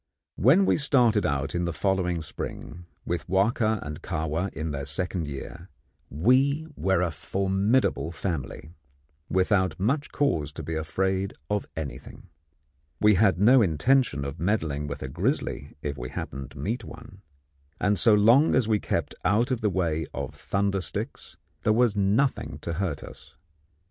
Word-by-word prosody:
When 150 Hz, -, +5 dB
we -, -, +3 dB
started 125 Hz, -8 st, +3 dB
out 70 Hz, 0 st, -1 dB
in 85 Hz, 0 st, 0 dB
the 85 Hz, -, -1 dB
following 90 Hz, 0 st, 0 dB
spring, 85 Hz, +2 st, -7 dB, 0.2 s
with 85 Hz, -3 st, -3 dB
Wahka 110 Hz, +3 st, +2 dB
and 75 Hz, 0 st, -7 dB
Kahwa 80 Hz, +5 st, -2 dB
in 80 Hz, +1 st, -4 dB
their 70 Hz, -1 st, -4 dB
second 85 Hz, +2 st, -2 dB
year, 70 Hz, -2 st, -8 dB, 0.4 s
we 130 Hz, -, +2 dB
were 95 Hz, -2 st, +1 dB
a 85 Hz, -, 0 dB
formidable 95 Hz, -, 0 dB
family, 80 Hz, -3 st, -4 dB, 0.6 s
without 95 Hz, 0 st, +1 dB
much 140 Hz, +9 st, 0 dB
cause 80 Hz, -, 0 dB
to -, -, -7 dB
be 80 Hz, -, -4 dB
afraid 95 Hz, +5 st, -1 dB, 0.2 s
of 105 Hz, -1 st, -1 dB
anything. 75 Hz, -4 st, -7 dB, 0.7 s
We 105 Hz, 0 st, +5 dB
had 95 Hz, -2 st, +3 dB
no 120 Hz, +5 st, +6 dB
intention 90 Hz, -, +2 dB
of 70 Hz, +3 st, -6 dB
meddling 80 Hz, -7 st, -1 dB
with 70 Hz, -, -5 dB
a -, -, -4 dB
grizzly 70 Hz, +2 st, -2 dB
if 70 Hz, -3 st, -3 dB
we 60 Hz, +1 st, -5 dB
happened 70 Hz, 0 st, -6 dB
to -, -, -15 dB
meet 115 Hz, +4 st, -3 dB
one, 105 Hz, -2 st, -12 dB, 0.6 s
and 100 Hz, -1 st, +1 dB
so 110 Hz, +1 st, +5 dB
long 115 Hz, +9 st, +5 dB
as 130 Hz, -4 st, +2 dB
we 110 Hz, -2 st, +2 dB
kept -, -, -2 dB
out 105 Hz, +7 st, +2 dB
of 125 Hz, -, -1 dB
the 105 Hz, -, +2 dB
way 80 Hz, -4 st, -1 dB
of -, -, -4 dB
thunder 100 Hz, -1 st, -1 dB
sticks 75 Hz, -, -5 dB, 0.2 s
there 110 Hz, -, +3 dB
was 115 Hz, -2 st, +3 dB
nothing 105 Hz, +7 st, +1 dB
to 85 Hz, -, -3 dB
hurt 85 Hz, -4 st, -2 dB
us. -, -, -13 dB
95 Hz, 160 wpm, -26 LUFS, 80-110 Hz, 0.7 s, no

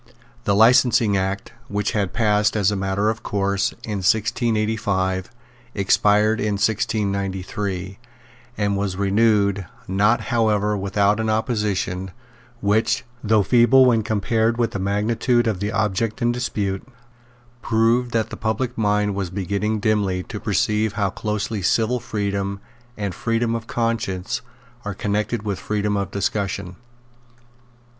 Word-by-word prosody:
The 100 Hz, -, +2 dB
Licensing 115 Hz, -1 st, +5 dB
Act, 95 Hz, +1 st, -2 dB
which 105 Hz, 0 st, -1 dB
had 100 Hz, -4 st, -1 dB
passed, 105 Hz, -2 st, +2 dB
as 100 Hz, -1 st, +3 dB
a -, -, -1 dB
matter 95 Hz, +2 st, 0 dB
of 110 Hz, 0 st, -7 dB
course, 100 Hz, -2 st, 0 dB
in 105 Hz, -2 st, -3 dB
1685, 105 Hz, -2 st, 0 dB, 0.5 s
expired 105 Hz, +2 st, +3 dB
in 105 Hz, 0 st, 0 dB
1693, 100 Hz, -2 st, -2 dB, 0.6 s
and 100 Hz, -1 st, 0 dB
was 100 Hz, -2 st, -2 dB
renewed, 100 Hz, -1 st, +2 dB, 0.2 s
not 105 Hz, +5 st, +3 dB
however 105 Hz, -2 st, +2 dB
without 100 Hz, +1 st, +1 dB
an 110 Hz, 0 st, 0 dB
opposition, 105 Hz, -5 st, -1 dB, 0.5 s
which, 110 Hz, +4 st, +1 dB, 0.2 s
though 110 Hz, -1 st, +3 dB
feeble 125 Hz, +4 st, +5 dB
when 115 Hz, -3 st, +4 dB
compared 110 Hz, +2 st, 0 dB
with 120 Hz, -2 st, +1 dB
the 100 Hz, -, -4 dB
magnitude 110 Hz, +5 st, +1 dB
of 110 Hz, -5 st, -1 dB
the 100 Hz, +2 st, -2 dB
object 110 Hz, +1 st, -1 dB
in 120 Hz, -1 st, +2 dB
dispute, 105 Hz, -6 st, -2 dB, 0.8 s
proved 115 Hz, +2 st, +2 dB
that 115 Hz, -2 st, -1 dB
the -, -, -5 dB
public 115 Hz, +3 st, -2 dB
mind 105 Hz, -1 st, +1 dB
was 95 Hz, -2 st, -3 dB
beginning 100 Hz, +3 st, -2 dB
dimly 100 Hz, -4 st, 0 dB
to -, -, -7 dB
perceive 105 Hz, 0 st, 0 dB
how 100 Hz, -2 st, 0 dB
closely 105 Hz, 0 st, -3 dB
civil 115 Hz, +6 st, +1 dB
freedom 100 Hz, -2 st, -3 dB, 0.4 s
and 100 Hz, -3 st, -3 dB
freedom 115 Hz, +4 st, -1 dB
of 115 Hz, -1 st, -4 dB
conscience 115 Hz, -5 st, -2 dB, 0.4 s
are 105 Hz, -2 st, -4 dB
connected 105 Hz, +3 st, -1 dB
with 100 Hz, -3 st, -3 dB
freedom 105 Hz, -1 st, -1 dB
of 100 Hz, -2 st, -1 dB
discussion. 100 Hz, -2 st, -2 dB
105 Hz, 130 wpm, -22 LUFS, 100-110 Hz, 0.8 s, Licensing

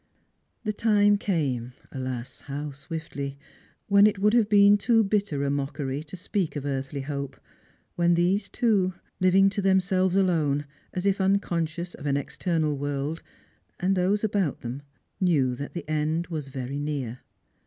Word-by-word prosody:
The 215 Hz, -1 st, -1 dB
time 205 Hz, -1 st, +3 dB
came 135 Hz, -, -1 dB
— -, -, -27 dB
alas, 130 Hz, -2 st, -5 dB
how 145 Hz, +1 st, -4 dB
swiftly! 140 Hz, -1 st, -6 dB, 0.2 s
— -, -, -33 dB
when 200 Hz, 0 st, +7 dB
it 210 Hz, -, 0 dB
would 210 Hz, +2 st, +3 dB
have 230 Hz, -3 st, +4 dB
been 205 Hz, -1 st, +7 dB
too 225 Hz, +2 st, +3 dB
bitter 195 Hz, -8 st, 0 dB
a 140 Hz, -, +1 dB
mockery 140 Hz, 0 st, -2 dB
to 175 Hz, -, -8 dB
speak 185 Hz, -2 st, -2 dB
of 145 Hz, -1 st, -4 dB
earthly 135 Hz, 0 st, -3 dB
hope, 140 Hz, -1 st, -5 dB, 0.6 s
when 175 Hz, 0 st, +3 dB
these 190 Hz, +4 st, +1 dB
two— 200 Hz, -7 st, +1 dB, 0.2 s
living 185 Hz, +1 st, +5 dB
to 200 Hz, -, -1 dB
themselves 190 Hz, -1 st, +2 dB
alone, 155 Hz, -7 st, +2 dB, 0.3 s
as 180 Hz, +1 st, -4 dB
if 195 Hz, 0 st, +2 dB
unconscious 175 Hz, -3 st, 0 dB
of 145 Hz, -, -7 dB
an 140 Hz, 0 st, +2 dB
ex 140 Hz, -, -5 dB
ternal 160 Hz, -4 st, 0 dB
world 145 Hz, +3 st, -3 dB, 0.3 s
— -, -, -40 dB
and 190 Hz, +2 st, +2 dB
those 190 Hz, +3 st, +1 dB
about 200 Hz, -7 st, 0 dB
them, 125 Hz, +4 st, -5 dB, 0.4 s
knew 150 Hz, -9 st, +2 dB
that 140 Hz, +6 st, -7 dB
the 170 Hz, -4 st, -5 dB
end 155 Hz, +2 st, 0 dB
waa 155 Hz, -2 st, -2 dB
very 135 Hz, +1 st, -4 dB
near. 140 Hz, -5 st, -3 dB
165 Hz, 165 wpm, -26 LUFS, 140-195 Hz, 0.6 s, when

